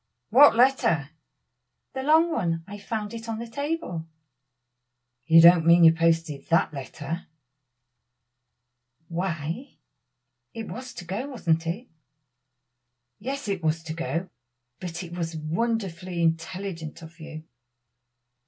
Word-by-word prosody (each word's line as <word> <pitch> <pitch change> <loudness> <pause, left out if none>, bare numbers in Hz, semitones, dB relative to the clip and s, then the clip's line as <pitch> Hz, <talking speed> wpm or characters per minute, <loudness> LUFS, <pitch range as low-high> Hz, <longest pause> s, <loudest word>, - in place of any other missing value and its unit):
what 275 +2 +7
letter?" 230 - +3 0.8
"The 265 - -3
long 320 +4 +4
one. 165 - -1
I 205 +2 -9
found 210 +1 -4
it 230 0 -7
on 225 - -2
the 230 - -5
table." 280 - -4 1.2
"You 165 0 +8
don't 170 -1 +8
mean 170 +1 +6
you 165 0 +8
posted 165 -3 0
that 165 -1 +3
letter?" 145 +4 -6 1.8
"Why, 170 - -4 0.8
it 225 -1 -5
was 255 +1 -8
to 175 - -8
go, 200 +10 -4
wasn't 170 - 0
it?" 205 +10 -3 1.3
"Yes, 270 +3 -4
it 195 -3 -2
was 160 0 0
to 160 -1 -5
go, 170 +2 -3 0.5
but 175 0 -5
it 175 0 -8
was 165 -2 -3
wonderfully 180 +1 -2
intelligent 165 0 -3
of 165 +2 -13
you." 155 -1 -9
175 Hz, 120 wpm, -26 LUFS, 165-230 Hz, 1.8 s, You